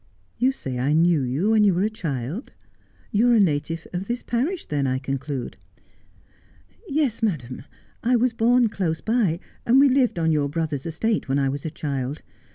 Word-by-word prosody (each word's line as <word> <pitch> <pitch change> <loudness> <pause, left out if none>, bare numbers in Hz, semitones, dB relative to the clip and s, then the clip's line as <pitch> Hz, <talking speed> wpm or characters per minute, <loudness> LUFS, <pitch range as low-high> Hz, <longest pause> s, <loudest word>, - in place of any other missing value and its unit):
' - - -38
You 255 +3 +3
say 130 - -5
I 135 +4 +1
knew 165 -1 +4
you 135 - 0
when 220 -1 +5
you 195 -4 +4
were 180 - +1
a 215 - +2
child; 160 - -4 0.6
you 225 +4 +3
are 240 - +5
a - - +5
native 165 -2 0
of 180 +2 -3
this 240 +1 -3
parish 290 +10 -1
then, 145 -2 -1
I 130 0 0
conclude? 135 -1 -4 0.4
' - - -33 0.2
' - - -30 0.3
Yes, 275 -6 0
madam, 145 - -2 0.4
I 245 +2 +2
was 245 0 +2
born 240 +2 +3
close 175 -6 -2
by, 215 -8 +1 0.2
and 250 +3 +4
we 280 0 +6
lived 255 -6 +2
on 160 -1 +2
your 145 -2 +1
brother's 155 -2 -3
estate 200 +1 -1
when 135 - +2
I 135 -1 +1
was 140 +2 -4
a - - -1
child. 140 -2 -4
170 Hz, 200 wpm, -24 LUFS, 140-230 Hz, 0.6 s, we